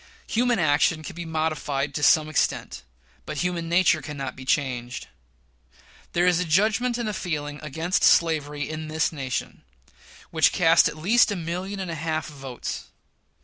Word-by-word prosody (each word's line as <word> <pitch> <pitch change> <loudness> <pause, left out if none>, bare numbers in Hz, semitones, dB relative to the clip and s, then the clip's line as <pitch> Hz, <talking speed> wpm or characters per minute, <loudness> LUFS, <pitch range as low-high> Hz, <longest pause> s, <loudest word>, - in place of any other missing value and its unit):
Human 240 0 +1
action 155 -1 +2
can 185 - -8
be 175 0 -6
modified 155 -3 -2
to 150 - -3
some 155 +1 +5
extent, 155 - -1 0.4
but 150 - -6
human 175 0 -2
nature 175 -2 +3
cannot 140 -4 -6
be 130 - -10
changed. 125 -3 -1 1.1
There 175 +1 +2
is 180 -1 +3
a - - +1
judgment 215 +8 +2
and 235 -2 -3
a 215 - -2
feeling 150 -6 -4
against 160 +4 -1
slavery 150 -3 +3
in 155 0 -5
this 160 +1 0
nation, 135 -5 -4 0.7
which - - +3
cast - - +5
at - - -5
least 215 +8 +4
a - - -1
million 180 +3 -4
and 185 -3 -4
a - - -3
half 160 0 -3
of 150 - -13
votes. 130 - -6
160 Hz, 165 wpm, -25 LUFS, 145-180 Hz, 1.1 s, some